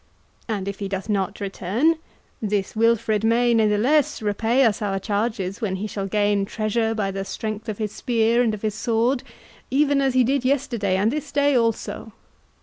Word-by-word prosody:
And 205 -4 -3
if 200 -1 -4
he 200 - -3
doth 195 +2 -4
not 200 0 -1
return, 205 - 0 0.4
this 205 -2 -1
Wilfred 225 -1 +2
may 235 +2 +3
natheless 225 +7 +2
repay 225 +4 +2
us 220 -2 +1
our 200 -2 -1
charges 200 -1 -2
when 200 -4 -1
he 195 +3 -4
shall 200 -2 -4
gain 205 0 +1
treasure 220 +2 -1
by 200 -3 -1
the 195 0 -3
strength 215 +2 -5
of 210 - -3
his 215 -2 -3
spear 230 0 +1
and 225 -3 +1
of 210 - -13
his 215 -1 0
sword, 235 +4 +1 0.5
even 280 +1 +2
as 265 -2 +1
he 255 - +5
did 270 +2 +1
yesterday 245 -8 0
and 205 +4 +2
this 300 0 -4
day 285 -1 +2
also. 230 -2 -1
220 Hz, 180 wpm, -23 LUFS, 205-240 Hz, 0.5 s, he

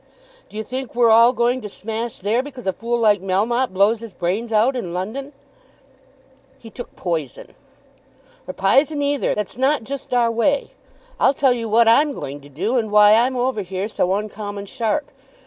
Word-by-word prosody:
D'you 215 +1 -5
think 260 +2 -6
we're 235 -2 +4
all 230 +2 +7
going 245 +1 0
to 210 - -7
smash 225 +3 -5
there 215 +6 0
because 265 -4 -10
a 190 - 0
fool 235 +1 -2
like 210 -4 +3
Melmotte 215 +7 0
blows 200 +4 +2
his 230 -3 -10
brains 190 +7 -2
out 225 +5 +3
in 180 -8 -4
London?" 240 +10 -5 1.3
"He 225 - -13
took 245 - -9
poison." 160 -7 -4 1.0
"Or 185 - -5
p'ison 285 +9 +2
either. 285 -1 0
That's 210 +2 -4
not 265 0 +1
just 275 +2 -7
our 240 -2 +2
way. 275 +5 0 0.5
I'll 275 - +3
tell 265 -2 +3
you 230 -2 -4
what 230 +2 +4
I'm 285 +6 +4
going 145 - -7
to 145 - -15
do; 195 - -1
and 220 -3 -1
why 210 0 +6
I'm 245 +4 +3
over 245 -3 0
here 190 +1 -4
so 190 -3 0
uncommon 205 -1 -5
sharp. 265 +6 -2
230 Hz, 180 wpm, -21 LUFS, 205-255 Hz, 1.3 s, all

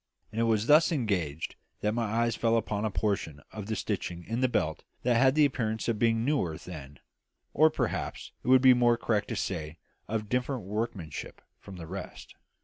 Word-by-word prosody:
And 110 +1 -1
it - - +3
was 110 -2 +2
while - - -7
thus 165 +2 +1
engaged 95 - -1 0.2
that 105 0 +1
my 115 0 0
eye 120 - +1
fell 115 0 +2
upon 105 -1 -1
a - - +1
portion 100 -8 -1
of 105 -2 -7
the 110 - -1
stitching 90 -5 -3
in 115 +7 -3
the 130 - +4
belt 80 -10 -1 0.2
that 125 -1 +3
had 130 +3 +4
the 155 -1 +6
appearance 110 -5 -1
of 115 -3 0
being 115 0 +2
newer 125 - 0
than 75 -6 -9 0.6
or 155 +2 +6
perhaps - - -3
it - - -10
would 130 0 +6
be 130 -1 +9
more 120 -1 +4
correct 110 -3 0
to 115 - -3
say 80 -5 -3 0.3
of 110 -1 -2
different 125 +2 -1
workmanship 100 -6 -4 0.2
from 100 - -11
the 85 -2 -8
rest. 95 +5 -8
110 Hz, 200 wpm, -29 LUFS, 95-120 Hz, 0.6 s, be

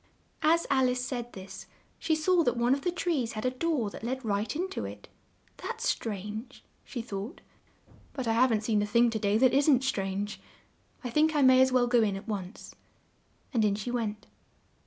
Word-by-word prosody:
As 335 +2 +3
Al 265 -2 +4
ice 250 0 -1
said 240 -2 -4
this, 190 0 -9 0.3
she 320 -1 +1
saw 345 +3 +3
that 245 -3 0
one 240 +2 +3
of 275 - -1
the 355 - 0
trees 325 -9 -1
had 215 +2 -4
a 255 - +2
door 255 -6 -1
that - - -9
led 260 +1 -3
right 205 +4 -1
in 360 +4 -1
to - - -4
it. - - -8 0.5
"That's - - -4
strange!" 215 +4 -4 0.2
she 240 -4 -6
thought; 210 - -6 0.7
"but 260 -3 -4
I 225 - +2
haven't 230 -2 +3
seen 215 -2 +1
a 210 - -1
thing 235 +2 +4
to 220 - -2
day 205 0 +2
that 255 +1 +4
isn't 275 -2 +4
strange. 200 -4 -2 0.6
I 245 - -4
think 310 +4 +3
I 290 - +4
may 260 0 +7
as 260 0 +4
well 250 -1 +4
go 245 -1 +3
in 205 -3 +1
at 195 +4 -8
once." 200 -2 -6 0.8
And 230 -3 +2
in 205 -1 +2
she 215 +4 -4
went. 215 -4 -3
240 Hz, 200 wpm, -29 LUFS, 210-265 Hz, 0.8 s, may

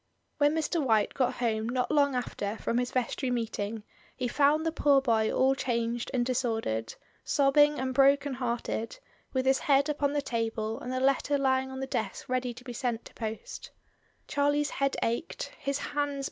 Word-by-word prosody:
When 290 +1 +4
Mr. 320 0 0
White 220 -5 +2
got 255 -2 0
home 225 -2 -1
not 250 0 -1
long 285 -3 +3
after 220 -3 -3
from 235 - -1
his 245 0 -1
vestry 255 +1 -1
meeting 225 -3 -3 0.3
he 250 - -1
found 295 +4 +3
the 325 - +1
poor 285 -3 +4
boy 225 -5 +1
all 265 +1 +3
changed 235 -2 -2
and 250 -3 +1
disordered, 225 - -1 0.3
sobbing 290 +1 +4
and 260 0 -2
broken 275 +1 +4
hearted, 235 - -3 0.3
with 260 -1 0
his 265 0 +3
head 280 +1 +3
upon 290 -1 0
the 290 - +1
table 225 -2 -2
and 250 - -6
the 255 - -1
letter 275 +2 +2
lying 265 -1 +1
on 265 0 -6
the - - -1
desk 220 -6 -3
ready 255 -1 -1
to 245 +1 -12
be 250 -1 -7
sent 235 -1 -2
to - - -13
post 220 -1 -6 0.6
Charlie's 290 +1 +1
head 275 0 0
ached, 235 +8 -2
his 275 0 -1
hands. 290 -1 -2
255 Hz, 180 wpm, -29 LUFS, 230-280 Hz, 0.6 s, When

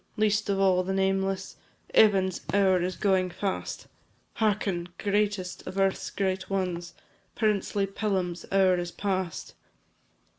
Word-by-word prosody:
least 210 -1 +1
of 195 -1 +1
all 190 -2 +4
the 190 +1 -2
nameless; 195 0 0 0.4
Evan's 190 -4 +4
hour 190 -3 +4
is 180 +1 -2
going 190 -1 +2
fast; 195 +2 -4 0.5
Hearken! 195 -5 0
greatest 205 -3 -1
of 185 +1 -6
earth's 195 -1 +1
great 190 -1 -2
ones 180 -3 -2 0.4
Princely 205 -2 +1
Pelham's 190 -3 -2
hour 190 -2 +4
is 175 0 -3
past. 185 -2 -3
190 Hz, 120 wpm, -27 LUFS, 185-200 Hz, 0.5 s, all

